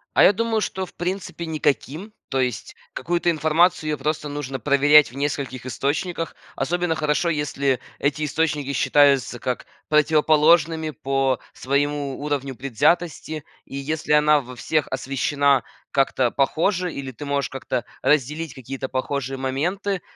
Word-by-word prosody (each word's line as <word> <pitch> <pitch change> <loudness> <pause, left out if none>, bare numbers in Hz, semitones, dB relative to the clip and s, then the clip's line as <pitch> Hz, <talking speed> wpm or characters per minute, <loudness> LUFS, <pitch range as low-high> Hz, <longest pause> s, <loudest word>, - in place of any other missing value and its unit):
А - - +6
я - - +7
думаю, 225 +1 0
что, 190 -2 -3
в - - -17
принципе, 180 -1 -4
никаким, 155 - -2 0.2
то 135 - 0
есть 125 -4 -2 0.2
какую-то 175 0 0
информацию, 155 +1 +2
её 150 - -1
просто 150 0 -2
нужно 145 -2 -4
проверять 145 +1 +5
в - - -14
нескольких 140 -3 -3
источниках. 160 +7 -2 0.2
Особенно 175 -1 0
хорошо, 155 +2 +1
если 140 -4 0 0.2
эти 150 +2 0
источники 150 -2 -1
считаются 135 -2 +3
как 125 +1 -3 0.2
противоположными 155 +1 +4
по 135 -1 0
своему 140 0 -1
уровню 140 -2 -3
предвзятости. 150 +4 0 0.2
И - - -10
если 150 +3 -3
она 150 0 +5
во 125 -1 -10
всех 155 +5 0
освещена 135 +1 +1 0.3
как-то 135 -3 +2
похоже 175 +6 +1
или 135 -1 -5
ты 145 +4 -9
можешь 140 -1 -1
как-то 130 -2 -3 0.2
разделить 150 +3 +1
какие-то 130 +1 -6
похожие 135 0 -2
моменты, 175 +9 -2
145 Hz, 135 wpm, -23 LUFS, 135-160 Hz, 0.3 s, я